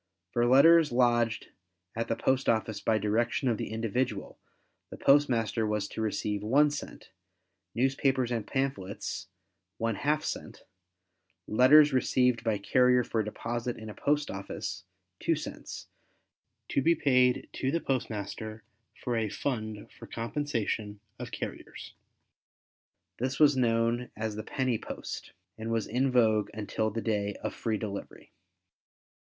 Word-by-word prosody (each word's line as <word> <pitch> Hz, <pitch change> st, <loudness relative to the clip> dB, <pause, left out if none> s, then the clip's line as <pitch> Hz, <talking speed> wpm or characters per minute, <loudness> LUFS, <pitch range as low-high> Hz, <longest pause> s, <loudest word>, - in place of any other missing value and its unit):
For 120 Hz, 0 st, +2 dB
letters 155 Hz, +4 st, +6 dB
lodged 120 Hz, -2 st, +2 dB, 0.5 s
at 115 Hz, +1 st, -2 dB
the 115 Hz, -, 0 dB
post 130 Hz, +2 st, +1 dB
office 110 Hz, -2 st, 0 dB
by 110 Hz, -, +2 dB
direction 115 Hz, +6 st, 0 dB
of 115 Hz, -3 st, +2 dB
the -, -, -3 dB
individual, 115 Hz, +3 st, -2 dB, 0.5 s
the -, -, -9 dB
postmaster 120 Hz, -6 st, +3 dB
was 105 Hz, -1 st, -1 dB
to -, -, -5 dB
receive 105 Hz, -1 st, -1 dB
1 140 Hz, +8 st, +4 dB
cent; 150 Hz, -, -8 dB, 0.6 s
newspapers 130 Hz, 0 st, +1 dB
and 115 Hz, -3 st, -2 dB
pamphlets 135 Hz, -8 st, -3 dB, 0.5 s
½ 115 Hz, +8 st, 0 dB
cent; -, -, -5 dB, 0.8 s
letters 145 Hz, +6 st, +6 dB
received 125 Hz, -2 st, +2 dB
by 110 Hz, -2 st, +1 dB
carrier 125 Hz, +4 st, +3 dB
for 115 Hz, -1 st, -1 dB
deposit 120 Hz, +3 st, -4 dB
in 110 Hz, -1 st, -8 dB
a -, -, -9 dB
post 145 Hz, +4 st, 0 dB
office, 95 Hz, -1 st, -6 dB, 0.3 s
2 -, -, +1 dB
cents, -, -, -7 dB, 0.8 s
to -, -, +1 dB
be 170 Hz, +5 st, +4 dB
paid 125 Hz, -4 st, +3 dB
to 130 Hz, -, -1 dB
the 165 Hz, +4 st, +1 dB
postmaster 110 Hz, -5 st, -4 dB, 0.4 s
for 120 Hz, -, -1 dB
a 110 Hz, -2 st, 0 dB
fund 110 Hz, -2 st, -3 dB
for -, -, -12 dB
compensation 115 Hz, -4 st, -3 dB, 0.2 s
of -, -, -5 dB
carriers. -, -, -7 dB, 1.3 s
This 130 Hz, +2 st, -2 dB
was 145 Hz, -2 st, +6 dB
known 115 Hz, 0 st, +1 dB
as 110 Hz, 0 st, -3 dB
the 110 Hz, -, -4 dB
"penny 125 Hz, 0 st, -1 dB
post" -, -, -7 dB, 0.3 s
and 110 Hz, +1 st, -4 dB
was 115 Hz, -2 st, 0 dB
in 130 Hz, +4 st, 0 dB
vogue 110 Hz, -4 st, +3 dB
until 110 Hz, +1 st, -1 dB
the 115 Hz, +2 st, -4 dB
day 105 Hz, -2 st, -1 dB
of -, -, -2 dB
free 110 Hz, -2 st, -2 dB
delivery. 100 Hz, -2 st, -7 dB
115 Hz, 135 wpm, -29 LUFS, 110-130 Hz, 1.3 s, letters